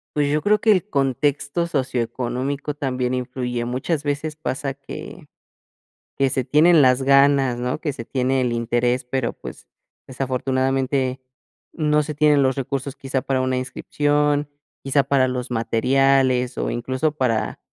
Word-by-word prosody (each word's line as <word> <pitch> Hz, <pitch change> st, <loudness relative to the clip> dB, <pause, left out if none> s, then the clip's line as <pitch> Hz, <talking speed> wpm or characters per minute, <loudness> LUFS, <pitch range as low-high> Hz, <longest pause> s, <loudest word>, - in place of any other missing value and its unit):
pues 145 Hz, -1 st, +1 dB
yo 150 Hz, +1 st, +1 dB
creo 210 Hz, +3 st, +3 dB
que 220 Hz, -, +3 dB
el 185 Hz, -, +1 dB
contexto 145 Hz, -, 0 dB
socioeconómico 130 Hz, 0 st, -2 dB
también 130 Hz, -3 st, -2 dB
influye, 125 Hz, -1 st, -3 dB
muchas 130 Hz, +6 st, -2 dB
veces 145 Hz, +1 st, -2 dB
pasa 135 Hz, -3 st, -3 dB
que 135 Hz, 0 st, -10 dB, 0.9 s
que 135 Hz, -1 st, +2 dB
se 130 Hz, 0 st, -1 dB
tienen 155 Hz, +4 st, +5 dB
las 130 Hz, 0 st, +4 dB
ganas, 140 Hz, -2 st, +4 dB
¿no?, 125 Hz, +4 st, -2 dB
que 150 Hz, -, -2 dB
se 115 Hz, -, -7 dB
tiene 130 Hz, +1 st, 0 dB
el 125 Hz, -1 st, 0 dB
interés, 120 Hz, +2 st, 0 dB
pero 125 Hz, -1 st, -2 dB
pues -, -, -11 dB, 0.4 s
desafortunadamente 130 Hz, 0 st, -1 dB, 0.5 s
no 150 Hz, -1 st, +1 dB
se 150 Hz, +1 st, -5 dB
tienen 150 Hz, -1 st, +4 dB
los 130 Hz, 0 st, +2 dB
recursos 135 Hz, +1 st, -4 dB
quizá 135 Hz, -1 st, -3 dB
para 135 Hz, -1 st, 0 dB
una 130 Hz, 0 st, 0 dB
inscripción, 145 Hz, +3 st, 0 dB, 0.4 s
quizá 140 Hz, +1 st, +3 dB
para 135 Hz, -1 st, +2 dB
los 125 Hz, 0 st, -4 dB
materiales, 125 Hz, +2 st, +2 dB
o -, -, -1 dB
incluso 130 Hz, +5 st, -1 dB
para 115 Hz, -6 st, -1 dB
135 Hz, 145 wpm, -22 LUFS, 125-145 Hz, 0.9 s, tienen